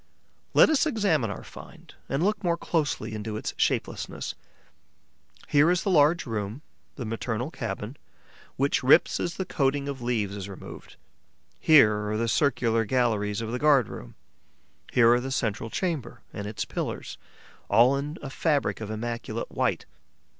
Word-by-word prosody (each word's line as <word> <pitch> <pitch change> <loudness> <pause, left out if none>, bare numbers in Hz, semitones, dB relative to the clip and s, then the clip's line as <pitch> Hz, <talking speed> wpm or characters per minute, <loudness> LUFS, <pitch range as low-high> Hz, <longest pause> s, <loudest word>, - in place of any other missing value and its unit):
Let - - +8
us 315 0 +3
examine 195 - +1
our 100 - -6
find - - -13 0.2
and 135 +4 0
look 205 +1 0
more 170 -2 +1
closely 155 -9 -1
into 105 0 -4
its - - -4
shapelessness. - - -2 1.1
Here 145 +3 +4
is 175 -1 +1
the 195 - 0
large 160 +1 +4
room, 110 +4 -4 0.3
the 125 - -5
maternal 115 +4 -3
cabin, 115 -1 -5 0.6
which 140 +2 +1
rips 135 +6 +5
as 170 - -2
the 190 - -3
coating 140 -2 0
of 140 -2 -5
leaves 110 -5 -1
is 100 -1 -6
removed; 95 - -10 0.6
here 105 -9 +5
are 110 - -1
the 115 +1 0
circular 115 -4 +2
galleries 110 -4 0
of 115 0 -4
the 125 - -2
guard 145 -6 +4
room; - - -9 0.8
here 120 -2 +6
are 120 - +3
the 135 - -4
central 115 -4 -2
chamber 160 -5 -3
and 105 -1 -5
its 105 - -4
pillars, - - -5 0.5
all 125 +4 +5
in 145 +3 -4
a 135 - -6
fabric 145 -5 0
of 110 - -5
immaculate 115 +1 -4
white. - - -1
125 Hz, 155 wpm, -26 LUFS, 110-150 Hz, 1.1 s, Let